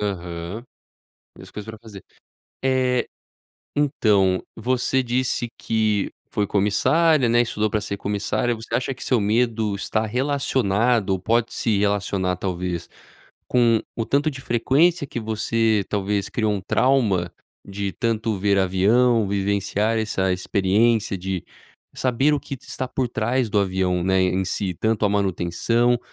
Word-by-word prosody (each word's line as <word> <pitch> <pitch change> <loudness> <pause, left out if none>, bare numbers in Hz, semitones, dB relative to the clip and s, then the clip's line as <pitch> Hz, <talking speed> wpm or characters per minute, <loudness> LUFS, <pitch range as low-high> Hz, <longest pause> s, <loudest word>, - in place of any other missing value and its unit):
aham, 90 +1 -4 0.7
e - - -11
as - - -12
coisas 105 0 -8
pra 110 - -11
fazer. 105 -5 -12 0.6
Eh, 130 -1 +1 0.7
então, 105 -10 +2
você 130 +3 0
disse 120 0 -1
que 110 -2 0 0.2
foi 105 - 0
comissária, 135 - +3
né, 120 +1 +4
estudou 110 -2 -1
pra 105 0 -1
ser 100 -1 -4
comissária, 105 +4 -1
você 110 0 -10
acha 130 +2 -1
que 130 - -9
seu 125 - +2
medo 110 0 +1
está 110 +2 -1
relacionado 125 -4 +1
ou 95 - 0
pode 115 +4 0
se 110 -3 0
relacionar, 100 -2 0
talvez, 90 -1 -3 0.6
com 120 -3 +3
o 115 - -2
tanto 145 +6 +1
de 135 - -9
frequência 145 +7 +2
que 120 - -5
você, 110 -1 0
talvez, 100 -1 -1
criou 110 -2 0
um 100 - -3
trauma 100 -6 +1 0.3
de 100 0 -4
tanto 115 -3 -1
ver 100 +1 +2
avião, 105 +5 +3
vivenciar 100 +2 0
essa 95 -4 0
experiência 100 +3 +1
de 95 0 -4 0.5
saber 130 +4 +1
o 145 - +1
que 140 - -7
de - - -24
está 130 - -4
por 130 -1 -1
trás 120 +1 -1
do 105 - 0
avião, 95 -2 0
né, 95 0 +2
em 95 +1 +1
si, 95 0 -2
tanto 110 +4 0
a 100 - +2
manutenção 100 +5 +1
110 Hz, 145 wpm, -22 LUFS, 100-120 Hz, 0.7 s, né